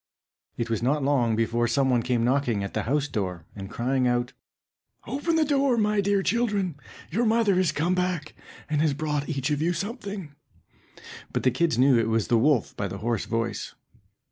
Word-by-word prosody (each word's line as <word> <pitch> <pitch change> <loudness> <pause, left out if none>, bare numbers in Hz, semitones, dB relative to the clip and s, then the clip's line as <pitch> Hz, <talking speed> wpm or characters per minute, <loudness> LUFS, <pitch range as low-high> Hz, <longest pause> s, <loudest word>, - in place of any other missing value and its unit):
It 115 - -2
was 115 - 0
not 140 +4 +1
long 125 -5 +2
before 115 +1 +1
some 130 +3 +2
one 120 -2 +3
came 120 -1 0
knocking 125 -5 +1
at 100 - -5
the - - 0
house 145 +1 +1
door, 90 - -4
and 95 -1 -7
crying 125 +3 0
out, 120 0 0 0.7
"Open 285 +8 -1
the 320 -1 +3
door, 275 -4 +2
my 210 -1 +2
dear 200 0 +1
children, 205 -6 0 0.4
your 225 +8 +1
mother 220 -4 +3
is 180 -5 +2
come 160 +4 0
back, 180 -4 -1 0.3
and 150 -1 0
has 155 -3 +2
brought 150 -1 -2
each 140 -1 -1
of 145 0 0
you 170 +2 +1
something." 200 - -5 1.0
But - - -2
the 130 - +4
little - - -8
kids 170 -8 +2
knew 130 -1 +5
it 115 -1 0
was 110 -2 0
the 115 - +4
wolf 135 -2 +2
by 100 - -2
the 95 - -6
hoarse 115 +2 -1
voice. 115 -1 -3
140 Hz, 195 wpm, -26 LUFS, 120-185 Hz, 1.0 s, knew